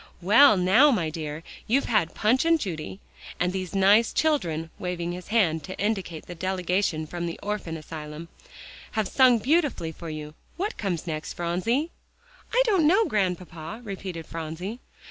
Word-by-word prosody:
"Well, 210 +6 +6
now, 190 +11 +5
my 175 - +1
dear, 155 0 -5 0.2
you've 265 +5 +2
had 210 -8 +1
Punch 230 +5 +2
and 330 0 +3
Judy, 180 - -5 0.4
and 180 +1 +1
these 185 0 -4
nice 200 +4 +5
children," 165 - 0
waving 175 -1 -3
his 180 +1 -7
hand 180 -8 +2
to 185 - -7
indicate 195 -6 -2
the 175 - -8
delegation 180 -2 -1
from 170 +2 -4
the 170 - -6
orphan 205 -6 -3
asylum, 155 0 -8 0.7
"have 220 -4 0
sung 255 0 +5
beautifully 265 - +1
for 165 +1 -8
you. 155 -1 -6
Now - - -17 0.2
what 405 +5 -3
comes 180 -6 -2
next, 155 -2 -4
Phronsie?" 225 - -1 0.6
"I - - +4
don't 380 -9 +3
know, 400 +7 +4
Grandpapa," 180 - -2
repeated 190 -5 -6
Phronsie. 165 +8 -6
185 Hz, 160 wpm, -26 LUFS, 165-225 Hz, 0.7 s, Well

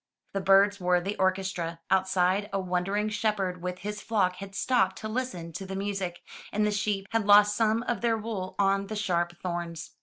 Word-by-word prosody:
The 195 - -1
birds 195 +1 +5
were 180 -1 +3
the 195 +4 -3
orchestra. 185 -3 -1
Outside, 190 +1 +2
a 195 - 0
wandering 190 +3 -1
shepherd 200 -4 -1
with 180 0 -3
his 210 +2 -5
flock 190 -5 +1
had 195 +1 -9
stopped 195 -4 +1
to 215 - -5
listen 215 -8 -4
to 195 - -6
the 190 - -5
music, 195 -3 -3 0.3
and 210 +1 +1
the 210 - +1
sheep 205 -1 -1
had 225 -2 0
lost 205 0 +7
some 225 +1 +2
of 240 -1 -2
their 230 -1 +2
wool 210 -4 -5
on 195 0 +2
the 215 - -5
sharp 175 -4 -1
thorns. 170 -2 -4
195 Hz, 190 wpm, -28 LUFS, 180-210 Hz, 0.3 s, lost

